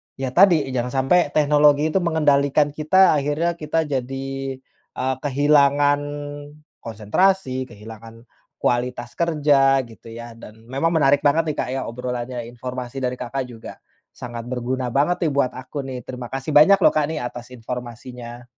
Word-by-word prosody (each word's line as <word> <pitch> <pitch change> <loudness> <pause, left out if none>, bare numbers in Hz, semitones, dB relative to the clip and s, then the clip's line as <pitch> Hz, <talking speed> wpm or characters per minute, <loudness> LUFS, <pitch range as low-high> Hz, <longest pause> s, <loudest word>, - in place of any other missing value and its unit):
ya 135 -1 -3
tadi, 175 -2 +5
jangan 125 0 -1
sampai 170 +2 +3
teknologi 150 0 +4
itu 190 - +1
mengendalikan 145 -3 +2
kita 185 +6 +4
akhirnya 150 +4 0
kita 160 +1 0
jadi, 135 -1 -3 0.7
eee, 130 +1 -1
kehilangan 145 0 +3 0.8
konsentrasi, 130 - 0
kehilangan 115 +1 -12 0.4
kualitas 120 0 -1
kerja 145 -5 +3
gitu 115 0 -14
ya, 120 0 -9
dan 110 0 -14
memang 140 +6 0
menarik 140 -2 +4
banget 155 +2 +3
nih, - - -9
Kak, - - -2
ya 135 - -2
obrolannya, 125 0 -5
informasi 125 +2 -6
dari 125 0 -1
Kakak 125 +2 -3
juga, 115 -2 -10 0.4
sangat 120 -1 -7
berguna 125 0 -3
banget 165 +5 +1
nih - - -1
buat 135 -2 +1
aku 135 +3 -6
nih. 130 -2 -6
Terima 125 -2 -7
kasih 135 +3 -4
banyak 180 +7 +7
loh, - - +4
Kak, 150 -2 +1
nih 160 - -3
atas 120 0 -8
informasinya. 120 0 -8
135 Hz, 150 wpm, -22 LUFS, 120-150 Hz, 0.8 s, banyak